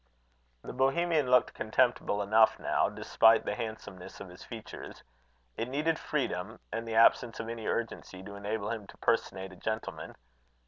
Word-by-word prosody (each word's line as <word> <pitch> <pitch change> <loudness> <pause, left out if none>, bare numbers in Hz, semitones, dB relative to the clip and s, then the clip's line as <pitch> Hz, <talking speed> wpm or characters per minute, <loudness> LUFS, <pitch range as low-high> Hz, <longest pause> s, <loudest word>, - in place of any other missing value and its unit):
The - - -7
Bohemian 145 +2 +2
looked 125 -1 +4
contemptible 110 -2 +1
enough 110 +2 +5
now, - - +1
despite 115 0 +4
the - - -1
handsomeness 110 -5 -7
of 100 - -8
his 90 +1 -12
features. 115 -2 -9 0.5
It 115 +2 -2
needed 155 +4 0
freedom, 110 -7 -2
and 115 +1 -3
the 110 - -3
absence 115 +1 +4
of 115 - -4
any 115 -1 -5
urgency, 105 -5 -3
to 100 - -9
enable 100 +1 -3
him 110 -4 -5
to - - -14
personate 95 -5 0
a - - -12
gentleman. 110 +2 -4
115 Hz, 155 wpm, -30 LUFS, 100-125 Hz, 0.5 s, enough